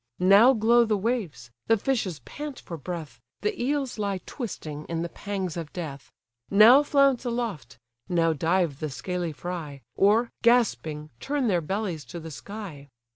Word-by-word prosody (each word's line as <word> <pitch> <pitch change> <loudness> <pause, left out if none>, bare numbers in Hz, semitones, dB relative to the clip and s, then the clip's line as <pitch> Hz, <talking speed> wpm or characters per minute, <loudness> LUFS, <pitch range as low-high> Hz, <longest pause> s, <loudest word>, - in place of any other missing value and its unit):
Now 200 +8 +7
glow 235 +1 +4
the 215 -2 +1
waves, 195 - -3 0.2
the 225 - +4
fishes 195 - -1
pant 295 -3 -7
for 170 - -8
breath, 155 -6 -7 0.2
The 210 +3 -2
eels 270 -2 -1
lie 200 -2 -1
twisting 155 - -6
in 165 0 -3
the 170 - -4
pangs 195 -4 -4
of 165 -3 -6
death: 150 -6 -7 0.4
Now 220 +7 +8
flounce 275 -4 +3
aloft, 230 - -4 0.3
now 165 -2 +2
dive 165 -1 0
the 155 - -3
scaly 175 +4 -3
fry, 150 -3 -6
Or, 220 +4 +3
gasping, 160 -11 +2
turn 280 -3 -1
their 175 -3 +2
bellies 185 -2 -3
to 175 - -8
the 160 0 -8
sky. 170 -5 -8
190 Hz, 155 wpm, -26 LUFS, 160-235 Hz, 0.4 s, Now